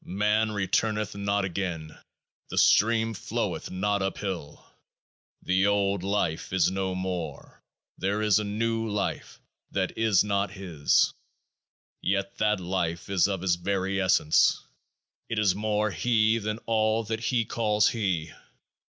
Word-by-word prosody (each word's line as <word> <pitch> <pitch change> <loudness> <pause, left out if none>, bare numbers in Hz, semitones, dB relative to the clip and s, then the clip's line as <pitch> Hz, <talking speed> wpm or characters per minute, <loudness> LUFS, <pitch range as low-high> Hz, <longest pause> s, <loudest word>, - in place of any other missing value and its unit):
Man 105 +3 +1
returneth 105 +1 0
not 100 0 0
again; 85 -4 -4 0.5
the - - -6
stream 115 +1 +4
floweth 95 - -3
not 100 +2 -1
uphill; 95 -5 -4 0.8
the 95 +2 +2
old 100 -2 +1
life 95 -4 -1
is 95 0 +2
no 95 -1 -2
more; 90 -3 -5 0.4
there 100 +3 0
is 105 -1 +4
a - - -2
new 115 +2 -1
life 105 -1 -3 0.3
that - - -2
is 110 -5 +4
not 100 -1 0
his. 90 -7 +1 0.9
Yet 100 0 -1
that 105 -1 +2
life 90 -1 -3
is 95 -1 +3
of 95 -3 -3
his 90 -2 +2
very 95 +1 -1
essence; 90 -4 +3 0.7
it 115 - -2
is 105 -3 +3
more 105 +1 0
He 115 0 +2
than 105 0 -3
all 110 0 +1
that 110 +1 -3
he 115 0 0
calls 105 -2 +2
He. 90 -8 -2
100 Hz, 135 wpm, -27 LUFS, 95-110 Hz, 0.9 s, stream